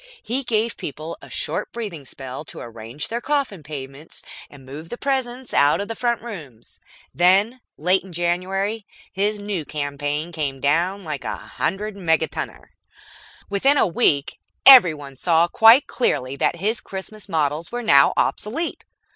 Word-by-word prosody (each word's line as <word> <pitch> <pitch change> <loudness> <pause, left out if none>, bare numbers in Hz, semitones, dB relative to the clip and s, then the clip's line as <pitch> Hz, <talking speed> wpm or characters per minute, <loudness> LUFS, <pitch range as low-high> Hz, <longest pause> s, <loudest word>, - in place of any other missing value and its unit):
He 260 +4 -1
gave 230 -2 0
people 155 +3 -6
a - - -13
short - - -2
breathing 195 -11 -6
spell 130 0 -8
to - - -9
arrange 115 +4 -6
their 235 +1 -3
coffin 275 - -1
payments 140 0 -9 0.3
and 140 -2 -15
move 150 +5 -9
the 240 - -6
presents 260 -2 -2
out 145 +1 +4
of 200 - -3
the 225 - -5
front 235 -1 -1
rooms. 150 - -10 0.3
Then, 200 +8 +3 0.2
late 180 +5 +3
in 190 - -13
January, 190 +5 -2 0.3
his 205 +2 0
new 205 -5 -4
campaign 145 +2 -3
came 145 -5 -3
down 170 +8 +1
like 150 -4 -5
a - - -3
hundred 205 +4 -3
megatonner. 160 -5 -1 0.8
Within 265 +9 +3
a - - +4
week, 150 -6 +1 0.3
everyone 155 - +7
saw 165 +4 +3
quite 225 +9 +6
clearly 130 - -1
that 140 - +1
his 210 +6 -1
Christmas 200 +2 -8
models 155 -1 -1
were 245 0 -4
now 140 -8 +6
obsolete. 290 +11 -1
175 Hz, 150 wpm, -22 LUFS, 145-220 Hz, 0.8 s, everyone